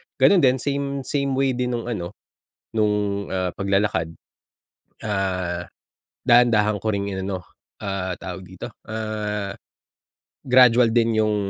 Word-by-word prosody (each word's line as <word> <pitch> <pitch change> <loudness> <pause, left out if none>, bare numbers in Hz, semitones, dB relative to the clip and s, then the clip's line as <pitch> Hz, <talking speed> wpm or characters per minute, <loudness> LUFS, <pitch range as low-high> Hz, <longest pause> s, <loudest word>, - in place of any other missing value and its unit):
ganun 195 - +5
din 130 -3 +4
same 140 0 -2
same 140 -1 -1
way 135 0 +2
din 125 0 -1
nung 115 - -3
ano, 105 -5 -4 0.6
nung 105 -2 +1
ah, 90 -1 0
paglalakad. 95 -4 0 0.9
Ah, 95 -4 -2 0.6
dahan-dahan 110 -4 +4
ko 110 - -1
ring 100 -1 -1
inano, 95 -2 -4 0.4
ah, 95 -2 -2
tawag 90 +2 -7
dito? 90 0 -9 0.2
Ah, 105 -2 -3 0.9
gradual 125 -2 +6
din 115 -1 +2
yung 105 -1 +1
105 Hz, 120 wpm, -23 LUFS, 95-120 Hz, 0.9 s, gradual